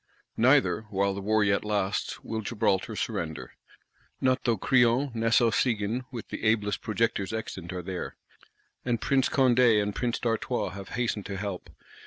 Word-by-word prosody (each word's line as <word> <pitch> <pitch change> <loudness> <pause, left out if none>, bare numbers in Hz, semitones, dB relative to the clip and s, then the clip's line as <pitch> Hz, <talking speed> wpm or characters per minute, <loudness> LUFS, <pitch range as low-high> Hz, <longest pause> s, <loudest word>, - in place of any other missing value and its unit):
Neither, 125 -3 +3
while 100 -1 +1
the 100 - -5
War 110 +1 +2
yet 100 -1 +2
lasts, 105 -2 -2
will 110 -1 -3
Gibraltar 100 -3 0
surrender. 80 -3 -4 0.7
Not 130 0 +1
though 115 -3 +2
Crillon, 125 +4 +3
Nassau 115 +1 +3
Siegen, 115 +1 0
with 120 -3 -7
the - - -6
ablest 105 -2 +1
projectors 110 -3 -1
extant, 95 -5 -5
are 90 -1 -5
there; 90 0 -5 0.7
and 120 -2 0
Prince 135 +2 +2
Condé 125 -4 +4
and 105 0 -1
Prince 120 +1 -1
d'Artois 115 -2 -1
have 100 0 -9
hastened 115 -5 -1
to 100 -1 -4
help. 100 -2 -5
110 Hz, 155 wpm, -28 LUFS, 100-120 Hz, 0.7 s, Condé